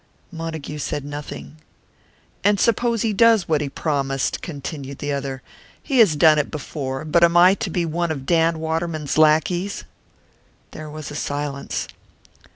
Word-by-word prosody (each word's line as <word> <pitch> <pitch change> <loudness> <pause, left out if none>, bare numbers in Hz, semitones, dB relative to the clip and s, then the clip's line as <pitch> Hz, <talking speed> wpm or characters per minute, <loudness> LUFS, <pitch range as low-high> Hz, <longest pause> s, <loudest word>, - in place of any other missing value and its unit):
Montague 160 -3 -6
said 145 0 -3
nothing. 80 - -8 0.9
"And 205 0 +3
suppose 230 +1 +1
he 220 -2 0
does 225 -2 +4
what 155 -2 +1
he 145 - -2
promised?" 135 -2 -1
continued 140 -3 -6
the 145 -1 -3
other. 135 -2 -4 0.4
"He 270 -4 +1
has 200 -9 +6
done 155 0 +5
it 145 - -1
before 140 -2 -5
but 170 +2 +3
am 170 0 +5
I 180 +2 +7
to 200 0 -3
be 175 0 -1
one 170 +1 -1
of 140 -4 -4
Dan 165 0 +2
Waterman's 160 -2 -2
lackeys?" 160 +5 +2 0.9
There 155 0 -8
was 155 0 -7
a - - -7
silence. 145 -1 -3
155 Hz, 155 wpm, -22 LUFS, 145-175 Hz, 0.9 s, I